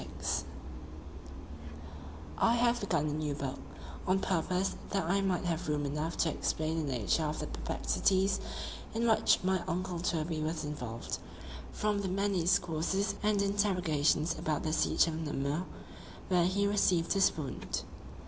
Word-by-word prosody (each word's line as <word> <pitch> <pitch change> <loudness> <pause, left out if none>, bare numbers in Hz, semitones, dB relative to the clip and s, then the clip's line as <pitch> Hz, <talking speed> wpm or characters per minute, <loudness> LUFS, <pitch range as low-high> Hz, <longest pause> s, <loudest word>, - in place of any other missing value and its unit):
XXVI - - -3 2.0
I 230 - +4
HAVE 240 0 +3
begun 155 -6 0
a - - -2
new 150 -1 -2
book, 140 -2 -4 0.5
on 185 +1 +4
purpose 185 0 0
that 195 -1 0
I 195 +3 +2
might 190 -2 0
have 170 -1 -1
room 145 -1 0
enough 150 +4 -2
to 165 - +2
explain 160 +2 -1
the 150 -3 -2
nature 125 +5 +1
of 150 +1 -2
the - - -2
perplexities 190 0 +1 0.6
in 230 +1 +1
which 220 - +5
my 185 -1 +2
uncle 180 0 -2
Toby 160 -2 -1
was 155 0 -2
involved, 125 -6 -5 0.5
from 210 -1 0
the 195 - -2
many 195 0 +1
discourses 175 +3 +1
and 210 -1 +2
interrogations 180 -6 +2
about 155 -2 -1
the 155 - -1
siege - - +3
of 165 -1 -3
Namur, 150 +2 -1 0.6
where 180 -2 +4
he 200 +3 +1
received 185 -4 +2
his 195 -4 +3
wound. 140 -5 -4
170 Hz, 150 wpm, -32 LUFS, 155-195 Hz, 2.0 s, which